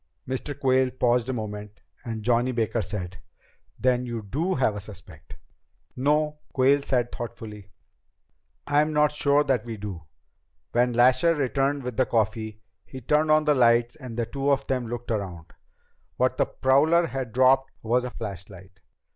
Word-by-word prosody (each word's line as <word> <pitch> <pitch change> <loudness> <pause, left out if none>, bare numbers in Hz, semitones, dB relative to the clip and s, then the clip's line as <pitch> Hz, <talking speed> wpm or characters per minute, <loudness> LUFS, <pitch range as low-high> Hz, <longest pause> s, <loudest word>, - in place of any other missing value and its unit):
Mr. 130 +2 -4
Quayle 130 -1 +3
paused 125 -1 +1
a - - 0
moment, 105 -2 -6 0.2
and 115 -3 -5
Johnny 120 +2 +2
Baker 115 -1 -1
said, 95 -1 -6 0.6
"Then 125 -1 +1
you 120 -3 -5
do 160 - -1
have 125 -6 +1
a 105 - -5
suspect?" 90 -6 -12 0.6
"No," 150 +3 +1
Quayle 140 +2 +4
said 125 -3 0
thoughtfully, 110 -4 -8 1.0
"I'm 150 +2 +2
not 150 0 +3
sure 145 0 +2
that 130 -6 0
we 115 -2 -6
do. 100 -4 -6 0.7
When 120 +1 +2
Lasher 130 +8 +4
returned 140 0 0
with 125 -2 -5
the 130 - +2
coffee, 110 -1 -1 0.2
he 130 - -10
turned 150 +5 +1
on 155 0 +5
the 150 -1 +3
lights 120 -1 +3
and 130 -6 -9
the 120 - 0
two 135 +4 -2
of 140 -1 +2
them 125 -3 -2
looked 120 +1 -5
around. 95 -7 -4 0.6
What 130 0 +1
the - - +2
prowler 155 +6 +3
had 135 -6 -4
dropped 130 +2 +4
was 120 +3 +1
a 125 - -3
flashlight. 95 -3 -9
125 Hz, 160 wpm, -25 LUFS, 110-135 Hz, 1.0 s, on